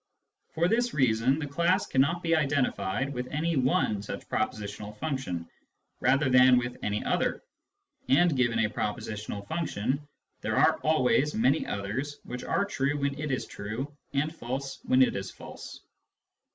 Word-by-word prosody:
For 165 +2 +3
this 240 +4 +1
reason 130 0 +3
the 155 - -3
class 170 +7 +1
cannot 155 +7 +1
be 170 - -2
identi 145 -4 +2
fied 135 +9 -2
with 125 -1 -4
any 160 +3 0
one 125 -6 +2
such 100 - -7
propositional 105 0 -3
function 105 - -3 0.5
rather 135 +1 +3
than 130 0 +7
with 120 0 -1
any 105 0 -1
other - - 0 0.3
— - - -53 0.3
and 160 +3 +4
given 120 -3 +2
a - - -1
propositional 105 -1 -4
function, 145 -3 -2 0.3
there - - -1
are - - +4
always 150 -1 +2
many 130 +7 +2
others 120 +9 -3
which 125 0 -6
are 200 - +1
true 145 -6 -1
when 140 0 -1
it 155 0 -3
is 130 - -1
true 120 +8 -6 0.2
and 150 +3 0
false 135 0 -5
when 130 +1 +5
it - - +1
is 95 -1 -4
false. - - -10
135 Hz, 160 wpm, -28 LUFS, 115-150 Hz, 0.5 s, than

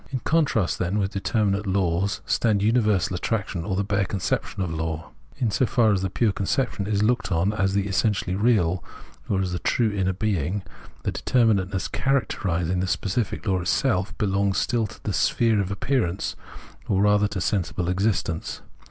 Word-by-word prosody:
In 130 - -2
contrast, 145 - +1
then, 90 +3 0
with 100 -1 -1
determmate 100 0 0
laws 95 0 0
stands 105 -4 +1
universal 105 -5 +2
attraction, 95 -3 -2
or 95 +1 -2
the 100 - +1
bare 100 -1 0
conception 95 +1 -2
of 85 -3 -3
law. 80 0 -4 0.3
In 120 -4 0
so 125 - +2
far 110 -3 +3
as 95 - 0
this 95 - -1
pure 110 +1 +2
conception 105 0 -1
is 105 -1 +1
looked 120 -1 +1
on 90 +5 +1
as 95 -2 0
the 100 -1 +1
essentially 95 -2 0
real, 95 -5 +2 0.5
or 95 -1 +1
as 95 -1 -1
the 90 - -2
true 115 -3 +1
inner 95 -2 0
being, 95 -1 -1 0.4
the - - -1
determinateness 100 -6 +1
characterising 90 -10 0
the 95 - 0
specific 100 +4 -1
law 95 -3 +1
itself 95 +1 0
belongs 100 -1 +1
still 115 -3 +1
to - - -14
the - - -2
sphere 115 -3 +2
of 95 - -3
appearance, 100 -2 -1 0.5
or 100 -1 +2
rather 105 0 +4
to 100 -1 -4
sensible 90 -2 -1
existence. 95 -3 -1
100 Hz, 170 wpm, -24 LUFS, 95-110 Hz, 0.5 s, rather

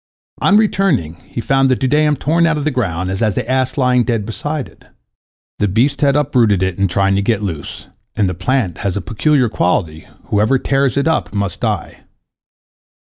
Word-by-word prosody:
On 200 - +4
returning, 195 - +1
he - - -6
found 135 +2 +2
the 130 - +3
dudaim 150 +4 +2
torn 165 +4 +1
out 165 -1 +1
of 150 - -3
the 155 - 0
ground, 95 -8 -2
and 95 - -3
the 110 -1 -1
ass 130 +1 0
lying 125 -2 +3
dead 115 -4 -1
beside 145 +6 -4
it. - - -21 0.7
The 105 - +2
beast 130 +8 +1
had 140 -1 +3
uprooted 120 -10 +2
it 95 0 -2
in 100 - +3
trying 95 +2 +1
to - - +1
get 105 0 0
loose, 80 -7 -6 0.3
and 105 - +1
the 90 - -2
plant 95 -1 -1
has 100 -1 -2
a - - 0
peculiar 125 - +1
quality, 85 -6 -1 0.2
whoever 110 +6 +2
tears 135 0 0
it 140 - +1
up 105 - -1
must 100 -1 -2
die. - - -3
120 Hz, 185 wpm, -17 LUFS, 100-140 Hz, 0.7 s, On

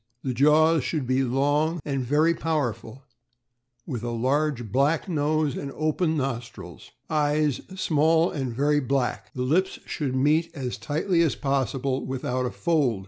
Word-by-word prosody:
The 130 - -1
jaws 150 +3 +4
should 150 -2 -2
be 130 +2 +1
long 145 +6 +1
and 135 -3 -1
very 150 +6 +3
powerful, 135 -7 -3 0.8
with 125 -8 -4
a 120 - -3
large 125 0 -1
black 145 - +1
nose 155 -3 0
and 140 - -5
open 155 +1 0
nostrils. 120 - -5 0.2
Eyes 150 -2 +1
small 160 -1 +2
and 135 -4 -3
very 145 +5 +2
black. 135 -2 -2
The 125 - -2
lips 180 +9 +1
should 140 -5 -3
meet 155 +5 +2
as 130 -4 -4
tightly 165 +4 0
as 160 -5 +2
possible, 135 -1 -1
without 130 -1 -2
a - - -2
fold. 145 - +1
145 Hz, 145 wpm, -25 LUFS, 130-155 Hz, 0.8 s, jaws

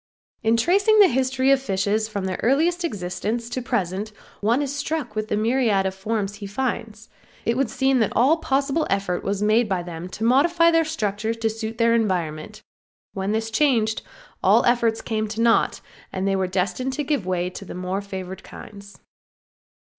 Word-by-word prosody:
In 225 +1 +2
tracing 400 - +3
the 405 - +9
history 260 +1 +1
of 275 -1 +4
fishes 205 -1 0
from 200 -3 -3
their 185 -1 -3
earliest 330 +8 +2
existence 210 - -3
to 255 +1 -3
the 235 - -14
present 195 +3 -1 0.3
one 235 +7 +2
is 280 0 -4
struck 285 -5 -3
with 215 0 -2
the 210 - -1
myriad 215 -4 +1
forms 200 +1 -2
he 205 -1 -7
finds. 225 -1 -4 0.4
It 230 - +1
would 265 -2 0
seem 265 +1 +2
that 220 - +1
all 270 +9 +4
possible 280 +1 0
effort 195 -3 -1
was 200 +1 -1
made 215 +1 +3
by 185 -2 -1
them 170 0 -7
to 210 - -6
modify 335 +8 +4
their 330 -1 +3
structure 220 -7 -2
to 225 -1 -1
suit 225 0 -5
their 230 0 +3
environment; 185 -4 -2 0.5
when 195 0 -2
this 225 +1 -1
changed 225 -4 +2 0.4
all - - +5
their - - +5
efforts 230 -2 0
came 215 -1 -2
to 220 +2 -4
naught, 230 -1 +2 0.3
and 190 +1 -2
they 195 - +2
were 190 -1 0
destined 190 +8 -1
to 295 - -2
give 280 -9 -1
way 180 -1 -1
to 190 - -8
the 185 - -9
more 185 +2 -3
favored 190 -2 -7
kinds. 200 -1 -12
220 Hz, 185 wpm, -23 LUFS, 195-260 Hz, 0.5 s, the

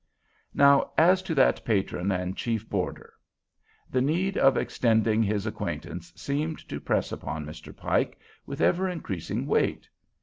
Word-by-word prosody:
Now 140 0 +5
as 180 +3 +5
to 185 -4 -3
that 135 - +3
patron 100 -3 0
and 90 0 -2
chief 115 -2 -2
boarder. 95 -3 -3 0.7
The 130 - 0
need 175 +8 0
of 135 -1 +4
extending 110 -2 +2
his 105 -1 0
acquaintance 110 - -5
seemed 150 +3 -3
to - - -4
press - - -1
upon 75 +1 -5
Mr. 75 +2 -10
Pike - - 0 0.3
with - - -5
ever 185 +2 +2
increasing 105 - -4
weight. - - 0
115 Hz, 140 wpm, -27 LUFS, 100-155 Hz, 0.7 s, Now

